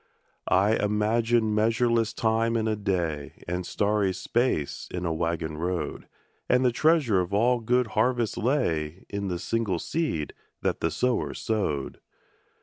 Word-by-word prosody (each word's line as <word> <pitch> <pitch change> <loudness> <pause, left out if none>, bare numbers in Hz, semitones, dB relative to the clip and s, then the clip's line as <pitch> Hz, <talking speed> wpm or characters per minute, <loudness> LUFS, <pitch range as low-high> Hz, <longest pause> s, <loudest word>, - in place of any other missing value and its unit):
I 100 +4 +3
imagined 110 +2 +1
measureless 115 +1 +2
time 115 +1 +1
in 110 0 0
a 110 - +1
day, 85 -8 -3
And 90 +1 -3
starry 100 -2 +1
space 95 - -1
in 90 0 -3
a 85 - 0
waggon 80 -1 -2
road, 90 +1 -3 0.4
And 125 +1 +4
the 125 - +4
treasure 145 - +3
of 90 +3 -3
all 120 +4 +3
good 125 +2 +2
harvests 120 0 +1
lay 90 - -1
In 100 0 -3
the 90 -2 -2
single 105 0 -1
seed 85 - -2 0.3
that - - 0
the 80 - +1
sower 125 +10 0
sowed. 95 - -2
105 Hz, 145 wpm, -26 LUFS, 90-115 Hz, 0.4 s, And